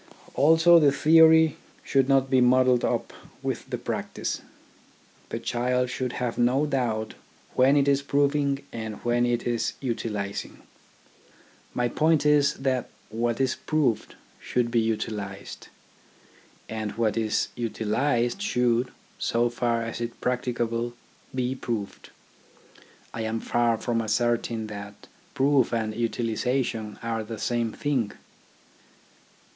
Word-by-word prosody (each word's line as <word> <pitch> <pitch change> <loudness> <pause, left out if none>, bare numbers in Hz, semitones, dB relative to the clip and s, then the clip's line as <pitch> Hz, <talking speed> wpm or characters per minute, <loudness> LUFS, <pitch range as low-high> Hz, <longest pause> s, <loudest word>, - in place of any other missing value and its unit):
Also 165 +4 +6
the 145 -3 +5
theory 160 +1 +6 0.3
should 135 0 +2
not 135 -1 +4
be 130 -1 +3
muddled 125 0 +4
up - - -1 0.3
with - - -3
the - - -2
practice. - - -4 0.9
The - - -3
child 125 +1 0
should 125 -1 -3
have 120 -2 -3
no 125 +5 +3
doubt 120 -6 -1 0.4
when 135 +3 +4
it 140 -1 +3
is 140 0 +3
proving 140 0 +1
and 110 -2 -5
when 120 0 +2
it 120 -1 -1
is 120 -1 -1
utilising. 105 -5 -4 1.1
My 120 0 +1
point 155 +4 +2
is 145 -1 +4
that 130 -2 -1 0.2
what 115 +2 -1
is 130 -2 +2
proved 150 -8 -1 0.2
should 120 -1 -1
be 120 - +3
utilised, 105 -3 -4 1.0
and 110 -1 -4
that - - -10
what 115 -2 +1
is 110 -2 0
utilised 120 - -1
should 125 - +1 0.2
— - - -32
so 120 +1 +2
far 120 -1 0
as 115 +1 -5
is 120 - -1
practicable 120 -1 -1 0.2
— - - -20
be 125 - -1
proved. 115 -6 -5 1.0
I 115 - -4
am 110 0 -2
far 120 -1 +1
from 115 +1 -1
assert 120 +2 +1
ing 115 -2 -3
that 100 -1 -9 0.3
proof 135 -2 +3
and 110 -2 -1
utilisation 115 -1 -1
are 115 -1 -2
the 110 +1 -7
same 120 -1 -1
thing. 130 -7 -1
120 Hz, 130 wpm, -26 LUFS, 115-135 Hz, 1.1 s, Also